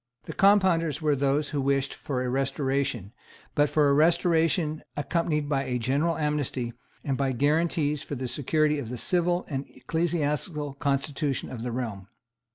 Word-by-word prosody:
The - - -7
Compounders 185 -7 +3
were 150 -3 +2
those 140 +2 +1
who 145 -2 -1
wished 135 0 +1
for 130 -3 -3
a 125 - -2
restoration, 135 -5 -1 0.4
but 145 0 +3
for 150 0 +3
a 140 - +4
restoration 165 0 +2 0.2
accompanied 150 0 0
by 140 -2 0
a 125 - -1
general 140 +8 0
amnesty, 145 -5 -1 0.3
and 135 - -1
by 135 0 0
guarantees 150 +2 +1
for 145 - -5
the 130 0 -4
security 150 +3 +1
of 120 -5 -5
the 125 - -4
civil 175 +5 +1
and 135 -2 -3
ecclesiastical 150 -2 -2
constitution 140 0 -1
of 120 - -6
the 120 +1 -3
realm. 110 -6 -4
145 Hz, 160 wpm, -27 LUFS, 135-155 Hz, 0.4 s, a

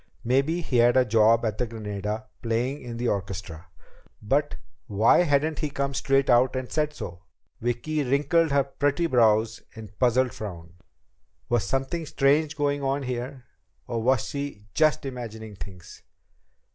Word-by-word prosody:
Maybe 140 +8 +1
he 130 -6 -1
had 120 +2 +5
a 130 - +5
job 115 +1 +4
at 110 -1 -2
the 125 - 0
Granada 105 -1 -4 0.2
playing 120 +5 -1
in 120 -2 -7
the 120 +1 -1
orchestra. 95 -4 -4 0.5
But 140 +7 0 0.3
why 110 0 +4
hadn't 155 -2 +2
he 150 - -1
come 140 0 -2
straight 135 0 +2
out 125 +1 +4
and 130 -1 -4
said 150 -1 0
so? 85 0 -7 0.4
Vicki 120 +6 -1
wrinkled 145 +5 +2
her 140 0 +4
pretty 145 +4 0
brows 115 -5 +3
in 110 -1 -8
a - - -13
puzzled 125 +3 +2
frown. 85 -6 -8 0.8
Was 120 -5 +1
something 135 - -2
strange 145 +2 +2
going 145 -1 0
on 135 +1 -1
here? 125 +1 -5 0.4
Or 115 -1 -3
was 130 0 +2
she 140 -8 -5
just 155 -2 +2
imagining 110 -5 -7
things? 90 0 -11
125 Hz, 155 wpm, -26 LUFS, 110-140 Hz, 0.8 s, had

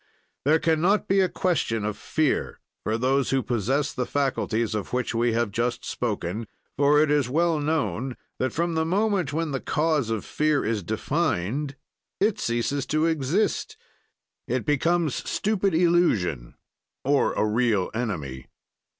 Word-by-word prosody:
"There 155 +3 +5
can 160 -1 +1
not 200 +5 +2
be 195 +1 +3
a 185 -1 +3
question 115 - 0
of 105 -1 -2
fear 155 -3 -1 0.2
for 110 +1 0
those 130 +3 +1
who 135 -1 +1
possess 130 +5 0
the 125 - -2
faculties 120 -5 0
of 105 +2 -4
which 125 0 -1
we 115 0 +1
have 115 -2 0
just 120 +3 -1
spoken, 105 -2 -3 0.3
for 145 +1 +4
it 150 -1 +3
is 145 -4 +2
well 165 +3 +2
known 135 - -1 0.2
that, 130 - 0
from 170 +1 -1
the 160 0 +1
moment 190 -3 +1
when 160 0 -1
the 135 - -1
cause 150 -5 0
of 110 -2 -2
fear 150 -1 +1
is 110 -1 0
defined 125 - -1 0.4
it 205 +1 +2
ceases 120 +4 -1
to 155 +1 +1
exist; 165 - 0 0.7
it - - -1
becomes 160 +1 +2 0.2
stupid 200 -4 0
illusion 160 - +2 0.5
or 140 +1 +2
a - - +1
real 110 -3 +1
enemy. 75 - -4
140 Hz, 150 wpm, -25 LUFS, 115-160 Hz, 0.7 s, There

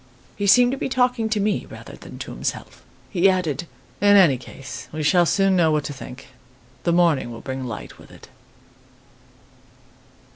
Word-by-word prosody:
"He 205 - -2
seemed 245 +4 +6
to 270 - -4
be - - -2
talking 250 -3 +1
to 215 -1 0
me 205 0 -1
rather - - -11
than - - -12
to - - -7
himself. - - -5 0.3
He 195 0 +4
added: 170 -4 -1 0.3
'In 205 0 +6
any 170 -9 +6
case, 135 +1 -10
we 155 0 -4
shall 175 +3 +4
soon 195 +1 +2
know 170 -3 +3
what 150 -1 +1
to 145 - -5
think. 130 0 -11 0.6
The 170 - +2
morning 170 -7 +2
will 115 - -9
bring 130 -1 -5
light 115 -4 -8
with - - -16
it. - - -15
175 Hz, 175 wpm, -22 LUFS, 145-205 Hz, 0.6 s, seemed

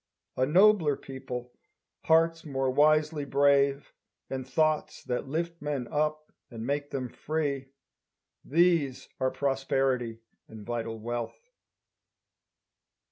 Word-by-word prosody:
A 130 - +1
nobler 180 -2 +5
people, 125 -2 -7 0.5
hearts 165 0 +3
more 135 -3 -1
wisely 155 +2 +3
brave, 140 0 +2 0.4
And 130 -1 -4
thoughts 155 +2 0
that 125 +2 -3
lift 170 +4 -3
men 145 -4 -3
up 155 +1 -1 0.2
and 115 -2 -7
make 145 +2 -2
them 130 -2 -3
free. 140 0 -3 0.8
These 165 -4 +2
are 130 -1 +2
prosperity 135 -4 0 0.3
and 110 -2 -11
vital 115 -1 -3
wealth! 120 +1 -4
140 Hz, 105 wpm, -29 LUFS, 130-155 Hz, 0.8 s, nobler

